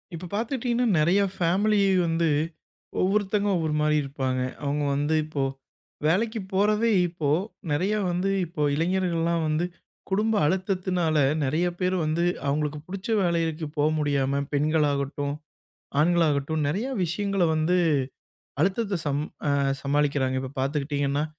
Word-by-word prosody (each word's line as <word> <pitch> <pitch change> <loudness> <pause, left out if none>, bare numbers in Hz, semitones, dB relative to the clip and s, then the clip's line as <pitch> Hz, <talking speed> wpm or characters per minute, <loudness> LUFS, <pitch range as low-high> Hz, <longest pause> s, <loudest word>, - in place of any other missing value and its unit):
இப்ப 180 +2 -7
பாத்துட்டீங்கன்னா, 240 +2 0
நெறைய 175 +6 +3
ஃபேமிலி 195 +5 +2 0.3
வந்து 165 0 +1 0.7
ஒவ்வொருத்தங்க 205 +1 +1
ஒவ்வொருமாரி 150 -2 +1
இருப்பாங்க. 130 -2 -2 0.2
அவுங்க 145 +1 -1
வந்து 145 +3 +1
இப்போ, 155 -3 -2 0.6
வேலைக்கிப் 210 +3 0
போறதே 210 +4 +2 0.2
இப்போ 165 -4 -3 0.4
நெறையா 185 +8 +1
வந்து 180 +3 0 0.2
இப்போ 160 -2 -6
இளைஞர்கள்லாம் 170 0 0
வந்து 155 +3 +1 0.4
குடும்ப 210 +3 +1
அழுத்தத்துனால 180 -2 0 0.3
நெறைய 155 +6 +1
பேரு 185 0 +1
வந்து 155 +2 0 0.2
அவுங்களுக்கு 150 +1 -1
புடுச்ச 190 +2 -7
வேலைகளுக்குப் 165 -3 -1
போக 145 +1 +3
முடியாம 140 -2 +1
பெண்களாகட்டும், 145 -1 0 0.7
ஆண்களாகட்டும் 160 -2 +2
நெறையா 210 - -1
விஷயங்கள 195 +3 0
வந்து, 160 +4 +2 0.8
அழுத்தத்த 195 +3 +1
சம் 145 +1 0 0.3
அ - - +3 0.3
சமாளிக்கிறாங்க. 140 -2 +1
இப்ப 130 0 -6
பாத்துக்கிட்டிங்கன்னா, 140 +1 0
165 Hz, 110 wpm, -26 LUFS, 145-190 Hz, 0.8 s, நெறைய